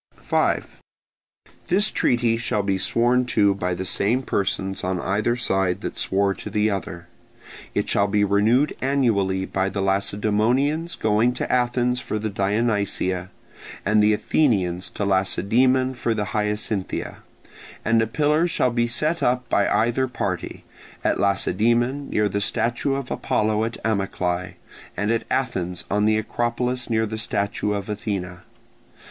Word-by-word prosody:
5. - - -1 0.9
This 205 +4 +3
treaty 120 -2 +2
shall 110 -3 -1
be 95 -1 0
sworn 120 +5 +2
to 100 -4 +3
by 90 -2 -2
the 95 - -4
same 115 +8 +1
persons 95 -3 -1
on 90 -1 -1
either 105 +6 0
side 95 -5 0
that - - -5
swore 100 +1 +1
to 100 - -8
the 105 +1 +1
other. 85 -3 -5 0.7
It - - 0
shall 100 - +2
be 105 0 +2
renewed 110 +8 +2
annually 105 -9 +1
by 95 0 -1
the 100 - -4
Lacedaemonians 110 - +1
going 110 +3 +2
to - - -3
Athens 125 0 +1
for 110 - -3
the 110 0 -3
Dionysia, 100 -3 0 0.6
and 105 +1 +4
the 105 +1 +4
Athenians 95 - +1
to 105 - -3
Lacedaemon 120 +7 +2
for 120 -2 -1
the 105 -1 -1
Hyacinthia, 105 -2 -2 0.7
and 115 0 +3
a 110 - 0
pillar 150 +7 +2
shall 130 -7 +1
be 120 0 +1
set 155 +8 0
up 125 0 +1
by 100 - +2
either 120 +3 +1
party: 125 - -4 0.4
at - - +1
Lacedaemon 120 +7 +1
near 105 0 +1
the 100 +1 -2
statue 120 +6 0
of 135 -2 -5
Apollo 110 0 0
at 115 - -4
Amyclae, 90 -4 -1 0.4
and 105 +3 0
at 115 0 0
Athens 90 -9 -1
on 105 +1 +2
the 110 0 +3
Acropolis 120 +3 -1
near 110 -1 +1
the 110 0 -4
statue 105 -1 -1
of 100 -1 -4
Athene. 95 -4 -4
110 Hz, 145 wpm, -23 LUFS, 100-120 Hz, 0.9 s, and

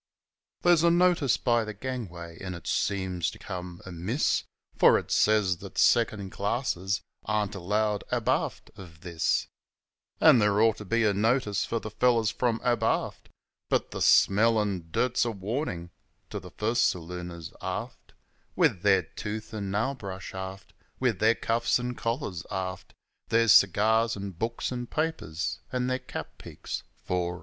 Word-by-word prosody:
There's 175 -2 +5
a 170 - +5
notice 175 -5 +3
by 120 -2 +2
the 110 -1 -6
gangway, 95 -9 -6
an' 90 -2 -5
it 85 - -11
seems 95 -4 -1
to - - -11
come 90 -1 -7
amiss, 95 - -1 0.3
For - - +6
it - - -5
says 105 -4 +3
that - - -11
second 110 -5 +3
classers 100 -3 -1 0.3
ain't 105 -1 0
allowed 105 +2 0
abaft - - -1
o' 95 - -8
this; 85 0 -1 0.7
An' 125 - +7
there 105 -1 +3
ought 110 0 +4
to 105 - -8
be 115 +4 +1
a 105 -2 +3
notice 110 0 +1
for 115 - -2
the 110 - -7
fellows 115 -1 +2
from 120 -3 0
abaft 120 -2 0 0.4
But - - 0
the - - -5
smell 110 +3 +5
an' 95 -5 -2
dirt's 125 +8 +1
a 120 - 0
warnin' 100 - -4 0.4
to - - -3
the - - -11
first 115 +3 +1
salooners, 85 -1 -7
aft; - - -6 0.4
With 90 - +2
their 95 -2 +4
tooth 105 +6 -6
and 100 -3 -4
nail 115 +7 0
brush, 100 -6 -7
aft, 95 +1 -7 0.3
With 120 -7 +1
their 110 +3 +4
cuffs 115 +2 +1
an' 125 0 -3
collars, 115 - -3
aft 95 -1 -5 0.3
Their 115 0 +3
cigars 110 +4 +5
an' 100 0 -5
books, 115 +9 -3
an' 120 -1 -4
papers, 150 - -2
an' 125 -1 -1
their 130 0 0
cap - - -8
peaks - - -6
fore 90 -1 -2
'n' - - -7
aft. - - -10
105 Hz, 160 wpm, -28 LUFS, 95-115 Hz, 0.7 s, An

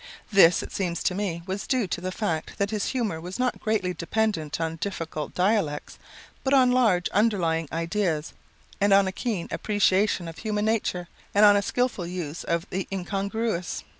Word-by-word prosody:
This, 185 -4 +6
it - - -8
seems 175 -3 -2
to - - +1
me, 180 -4 -3
was 190 +2 -4
due 255 -4 +1
to 175 - -4
the 185 +1 -3
fact 170 -6 -3
that 200 +1 0
his 210 -2 -1
humor 220 -11 -1
was 180 +2 -6
not 250 -1 0
greatly 210 -4 0
dependent 170 -3 -1
on 165 0 -2
difficult 165 -5 -4
dialects, 180 -6 0 0.4
but 270 +1 +3
on 255 -2 +5
large 225 -8 +3
underlying 175 -7 +1
ideas 165 -1 -1 0.5
and 200 0 +4
on 195 -1 +5
a - - -1
keen 205 -4 -3
appreciation 200 -3 +1
of 165 - -8
human 210 -1 -1
nature, 205 -5 0 0.3
and 205 +1 +7
on 205 0 +8
a 200 - +3
skillful 240 -4 -1
use 170 -3 -5
of 170 0 -1
the 190 0 -2
incongruous. 195 0 -2
190 Hz, 175 wpm, -26 LUFS, 170-215 Hz, 0.5 s, on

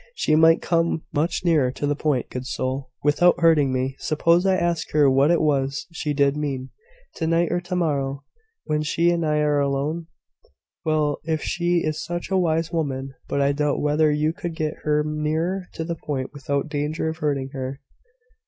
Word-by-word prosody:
She 155 - +2
might 160 +1 +5
come 165 -1 +1
much 160 +4 -1
nearer 155 -7 +3
to 145 - -3
the 145 0 +1
point, 145 -4 -1
good 125 0 -5
soul! 130 0 -3
without 160 +5 +4
hurting 160 -5 +4
me. 130 +1 -1
Suppose 170 +4 +2
I 190 - +4
ask 170 -2 -1
her 150 -2 +5
what 135 +3 +4
it 170 - +4
was 140 -2 0
she 150 -2 -2
did 140 -1 +2
mean, 135 -3 -3 0.5
to 160 - -1
night 165 +1 +2
or 175 - 0
to 180 +1 -4
morrow, 140 -5 -1 0.4
when 150 -1 -1
she 165 +3 +2
and 170 -1 0
I 150 -1 +1
are 150 -1 +2
alone?" 140 +4 -1 0.8
"Well! 155 -2 +1
if 160 -2 -1
she 175 -1 0
is 155 0 -2
such 175 +4 -5
a 190 - +3
wise 165 -1 0
woman. 135 -5 -2
But 140 - 0
I 140 0 +3
doubt 145 0 0
whether 150 +1 +2
you 150 +1 +1
could 175 -3 -5
get 155 -1 -2
her 150 0 +2
nearer 160 +5 -1
to 160 - -3
the 170 +1 -3
point 135 -3 -4
without 140 0 -2
danger 150 +1 -2
of 160 0 -3
hurting 140 -3 -1
her. 135 -1 -5
150 Hz, 190 wpm, -23 LUFS, 140-165 Hz, 0.8 s, might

